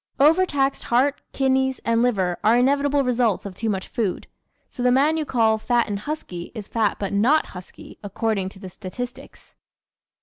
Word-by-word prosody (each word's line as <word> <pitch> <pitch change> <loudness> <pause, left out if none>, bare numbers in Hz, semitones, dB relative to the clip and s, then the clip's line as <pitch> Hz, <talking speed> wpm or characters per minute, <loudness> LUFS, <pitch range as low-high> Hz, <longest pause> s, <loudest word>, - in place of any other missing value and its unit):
¶ 275 - +6
Overtaxed 300 -5 +1
heart, 270 +4 +1
kidneys 265 -1 +1
and 230 0 +2
liver 190 -8 0
are 225 +3 +5
inevitable 280 +2 +2
results 240 -5 +1
of 200 - -6
too 225 +4 -3
much 190 -2 -2
food. 215 -7 -2 0.4
So - - -9
the 250 0 +3
man 285 +5 +3
you 315 -1 -1
call 225 -4 +2
"fat 240 +1 +1
and 205 -2 -3
husky" 205 - -6
is 210 -3 -7
fat 220 -3 0
but 200 -1 -4
not 255 +10 +3
husky, 180 -1 -12
according 205 -1 -2
to 190 - -15
the 190 -2 -9
statistics. 225 +7 -8
235 Hz, 175 wpm, -23 LUFS, 205-270 Hz, 0.4 s, ¶